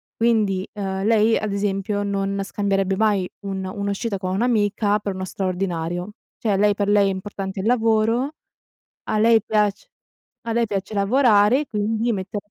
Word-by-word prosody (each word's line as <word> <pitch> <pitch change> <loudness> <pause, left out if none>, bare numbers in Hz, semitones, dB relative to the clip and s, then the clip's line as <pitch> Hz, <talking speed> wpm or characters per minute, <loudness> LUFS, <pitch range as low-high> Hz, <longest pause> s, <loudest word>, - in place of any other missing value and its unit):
Quindi, 210 -5 +1
uhm, 195 -2 -3
lei 220 +1 +3
ad 215 -1 -3
esempio 200 0 -1
non 200 0 -2
scambierebbe 195 0 0
mai 205 -3 +1
un 195 -1 -4
un'uscita 200 +2 -3
con 185 -1 -3
un'amica 210 -1 +1
per 200 -1 -3
uno 185 0 -4
straordinario. 180 -1 -3 0.3
Cioè 210 -3 0
lei 205 +1 +4
per 200 0 -2
lei 205 -1 +4
è - - 0
importante 190 0 -5
il 190 - -3
lavoro, 225 +2 +2 0.7
a 215 - -1
lei 225 0 +5
piac 210 -2 0 0.6
a 230 - -1
lei 235 0 +2
piace 200 -1 -4
lavorare, 220 +4 +3
quindi 220 +2 -1
mette 190 +1 -4
205 Hz, 155 wpm, -22 LUFS, 195-220 Hz, 0.7 s, lei